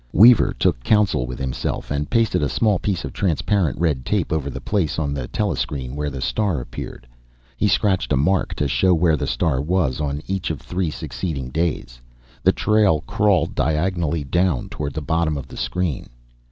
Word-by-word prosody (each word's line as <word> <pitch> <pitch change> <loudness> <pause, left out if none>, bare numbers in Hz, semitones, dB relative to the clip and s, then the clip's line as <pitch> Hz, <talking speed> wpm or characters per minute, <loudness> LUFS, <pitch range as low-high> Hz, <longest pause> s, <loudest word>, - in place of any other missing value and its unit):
Weaver 115 +5 +7
took - - +1
counsel 105 - +2
with 65 - -6
himself, 65 0 -3
and 75 +1 -1
pasted 115 -7 +2
a 70 - +1
small 105 -5 +2
piece 95 -5 -2
of - - -7
transparent 90 -2 0
red 75 -6 0
tape 95 +1 -1
over 75 -3 -1
the 65 - -6
place 95 -8 -1
on 70 -3 -1
the 65 -4 -4
telescreen 65 0 -2
where 75 0 -2
the 70 -2 -6
star 95 +2 0
appeared. - - -8 0.5
He 105 - +1
scratched 95 -5 +1
a 70 - +3
mark 90 +8 +1
to 75 - 0
show 85 +8 +3
where 80 -1 +3
the - - -3
star 65 - 0
was 75 -4 0
on 75 +1 -2
each 95 -2 -2
of 80 -4 -3
three 90 -2 -2
succeeding 75 -4 -4
"days." 65 -6 -2 0.4
The - - +5
trail 105 -8 +2
crawled 100 +2 +1
diagonally 80 +1 0
down 85 -1 0
toward 70 -2 -5
the 80 - -2
bottom 80 +1 0
of 70 -1 -7
the - - -11
screen. 70 +5 -2
80 Hz, 185 wpm, -22 LUFS, 70-95 Hz, 0.5 s, Weaver